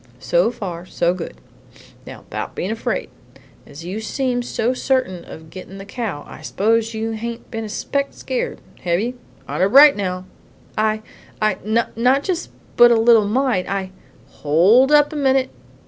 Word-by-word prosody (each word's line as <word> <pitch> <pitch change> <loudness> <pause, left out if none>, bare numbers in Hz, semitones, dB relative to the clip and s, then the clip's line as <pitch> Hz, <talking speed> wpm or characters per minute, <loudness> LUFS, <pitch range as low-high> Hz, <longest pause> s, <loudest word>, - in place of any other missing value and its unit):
"So 175 - +2
far, 180 -7 -6
so 170 0 +1
good. 180 - -7 0.7
Now - - -10
bout - - -5
bein' - - -2
afraid. - - -3 0.6
As 145 +4 -11
you 190 +5 -4
seem 250 +2 -1
so 240 0 -1
certain 255 -9 -1
of 160 0 -12
gettin' 190 +1 -10
the 195 - -9
cow, 205 -9 -5
I - - -11
suppose 225 +2 0
you 220 +1 -2
hain't 230 +1 -6
been 225 -1 -4
a 215 - -6
speck 280 +6 -1
scared, - - -4 0.2
hev 175 0 0
you? 245 +4 -3 0.3
Honor 190 +2 +1
bright, 280 +5 +8
now!" 185 -2 -3 0.5
"I 215 0 0 0.4
I 215 -3 +1
not 220 +3 0
but 255 +5 +3
just 360 -3 -2 0.3
a - - +9
little 230 -2 +5
mite. 245 -4 0
I" 195 -1 -3 0.5
"Hold 195 - +4
up 295 0 +5
a - - -6
minute. 265 -2 +2
220 Hz, 165 wpm, -20 LUFS, 185-255 Hz, 0.7 s, a